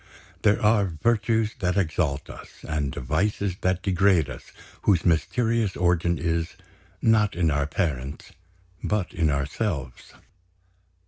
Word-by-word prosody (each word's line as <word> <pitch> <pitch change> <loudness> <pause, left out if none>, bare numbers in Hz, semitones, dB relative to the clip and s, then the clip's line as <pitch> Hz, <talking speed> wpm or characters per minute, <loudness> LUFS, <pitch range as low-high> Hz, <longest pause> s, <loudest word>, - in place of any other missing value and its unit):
There 105 -1 +3
are 105 -1 +3 0.2
virtues 115 -1 +2
that 90 -1 0
exalt 80 -6 0
us, - - -10 0.2
and 75 -3 -2
vices 100 - -1
that 90 0 0
degrade 95 -5 +3
us, - - -11 0.3
whose 90 -6 +2
mysterious 110 +6 +1
origin 85 -1 +2
is, 85 0 -2 0.5
not 110 -3 +3
in 85 -2 +2
our 70 -1 0
parents, 70 -5 -3 0.5
but 105 -4 -1
in 80 -3 +1
ourselves. 70 - -3
90 Hz, 120 wpm, -25 LUFS, 80-105 Hz, 0.5 s, There